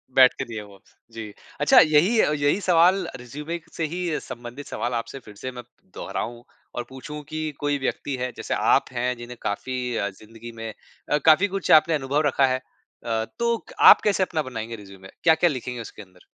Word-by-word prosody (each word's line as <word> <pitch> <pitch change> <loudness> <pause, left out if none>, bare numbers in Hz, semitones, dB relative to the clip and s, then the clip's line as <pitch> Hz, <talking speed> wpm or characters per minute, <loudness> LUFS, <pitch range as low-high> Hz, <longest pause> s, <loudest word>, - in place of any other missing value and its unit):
बैठ 130 -1 +7
के - - -2
दिए 110 -2 -6
वो, 100 -1 -15 0.3
जी। 110 -2 -8 0.3
अच्छा - - +7
यही 155 +9 +4
यही 150 +3 +2
सवाल 180 +1 +4
रिज़्यूमे 150 +7 -6
से 165 - -2
ही 175 -4 -2
संबंधित 120 +4 -9
सवाल 120 +1 -3
आपसे 115 +3 -4
फिर 105 -5 -14
से 130 +5 -6
मैं 125 -1 -9
प - - -36 0.3
दोहराऊँ 120 +1 -5 0.3
और 120 - -2
पूछूँ 150 +3 -8
कि 155 0 -3
कोई 145 0 0
व्यक्ति 135 +1 -2
है 125 0 -3
जैसे - - -3
आप - - +3
हैं 125 +1 -1
जिन्हें 120 0 -9
काफ़ी 125 +3 -3
अ, 100 - -1
जिंदगी 115 +4 -12
में 115 -1 -6 0.4
अ, 150 - +4
काफ़ी 160 +5 +6
कुछ 195 -1 -2
आपने 160 +1 +6
अनुभव 145 +1 0
रखा 135 0 +3
है। 130 0 +1
अ, 115 -3 -6
तो 235 0 +2
क - - -11
आप - - +9
कैसे 200 -2 +2
अपना 160 -4 -1
बनाएँगे 115 -3 -6
रिज़्यूमे? 95 -2 -13 0.2
क्या-क्या 165 +1 +5
लिखेंगे 125 -3 -4
उसके 110 - -10
अंदर? 90 -2 -18
130 Hz, 195 wpm, -24 LUFS, 115-155 Hz, 0.4 s, आप